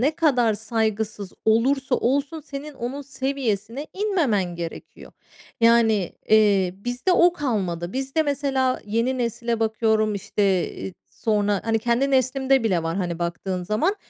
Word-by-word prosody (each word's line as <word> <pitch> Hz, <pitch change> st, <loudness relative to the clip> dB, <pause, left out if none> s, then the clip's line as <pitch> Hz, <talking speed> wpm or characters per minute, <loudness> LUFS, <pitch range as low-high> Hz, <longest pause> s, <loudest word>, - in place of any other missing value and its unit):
ne 275 Hz, +5 st, +3 dB
kadar 245 Hz, -9 st, +3 dB
saygısız 220 Hz, -2 st, -2 dB
olursa 255 Hz, +4 st, +2 dB
olsun, 285 Hz, +5 st, 0 dB
senin 285 Hz, 0 st, -8 dB
onun 260 Hz, +4 st, -5 dB
seviyesine 265 Hz, -2 st, -3 dB
inmemen 275 Hz, -, 0 dB
gerekiyor. 170 Hz, -1 st, -8 dB, 0.5 s
Yani, 225 Hz, -4 st, +4 dB, 0.2 s
eee, 200 Hz, -4 st, +4 dB
bizde 245 Hz, -, -1 dB
o 350 Hz, 0 st, +5 dB
kalmadı. 190 Hz, -, -2 dB
Bizde 270 Hz, +4 st, 0 dB
mesela, 275 Hz, -3 st, 0 dB
yeni 230 Hz, +5 st, 0 dB
nesile 235 Hz, -1 st, -2 dB
bakıyorum, 220 Hz, -1 st, +1 dB
işte, 200 Hz, +1 st, -2 dB, 0.3 s
eee, 190 Hz, -, -7 dB, 0.3 s
sonra 205 Hz, -3 st, +2 dB
Hani 225 Hz, 0 st, +1 dB
kendi 240 Hz, +5 st, +1 dB
neslimde 265 Hz, 0 st, +2 dB
bile 180 Hz, -7 st, +1 dB
var, 165 Hz, +2 st, -2 dB
hani 175 Hz, -3 st, -2 dB
baktığın 180 Hz, +2 st, -3 dB
zaman. 230 Hz, -, 0 dB
230 Hz, 130 wpm, -23 LUFS, 205-270 Hz, 0.5 s, o